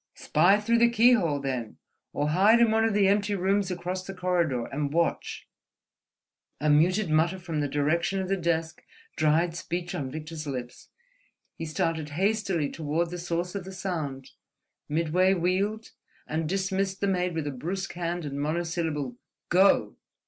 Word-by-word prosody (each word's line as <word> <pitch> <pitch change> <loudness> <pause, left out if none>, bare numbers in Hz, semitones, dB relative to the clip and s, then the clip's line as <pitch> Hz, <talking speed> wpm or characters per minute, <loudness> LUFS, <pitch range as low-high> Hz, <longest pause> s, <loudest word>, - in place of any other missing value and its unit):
"Spy 180 +7 +3
through 230 +2 +2
the 235 0 +5
keyhole, 225 -10 +4
then; 130 -5 -4 0.3
or 145 +1 -1
hide 200 +8 +5
in 235 -2 +5
one 220 0 +3
of 225 -2 +1
the 200 -2 +4
empty 205 +1 +2
rooms 195 +1 +1
across 180 +1 -3
the 195 +1 -8
corridor, 170 -10 0
and 140 0 -3
watch—" 170 +2 -1 1.1
A 150 +1 +2
muted 175 +5 +3
mutter 165 +4 +2
from 165 -4 -4
the 145 - 0
direction 155 +7 0
of 190 - -2
the 195 - +1
desk 165 -3 -1 0.3
dried 160 +2 +2
speech 175 +1 -4
on 145 -7 -3
Victor's 155 +1 -7
lips. 125 -3 -6 0.7
He 165 - -5
started 155 0 -1
hastily 195 -6 0
toward 165 +2 -2
the 180 - -5
source 175 +1 -2
of 200 -2 -4
the 190 - -9
sound, 155 -9 -4 0.6
midway 170 +5 +2
wheeled, 195 +5 -1 0.3
and 155 0 -2
dismissed 195 0 -1
the - - 0
maid 180 -2 0
with 160 -2 -2
a 145 - -2
brusque 180 +9 -4
hand 175 -1 -3
and 140 0 -4
monosyllable—"Go!" 165 +2 0
175 Hz, 155 wpm, -27 LUFS, 155-190 Hz, 1.1 s, the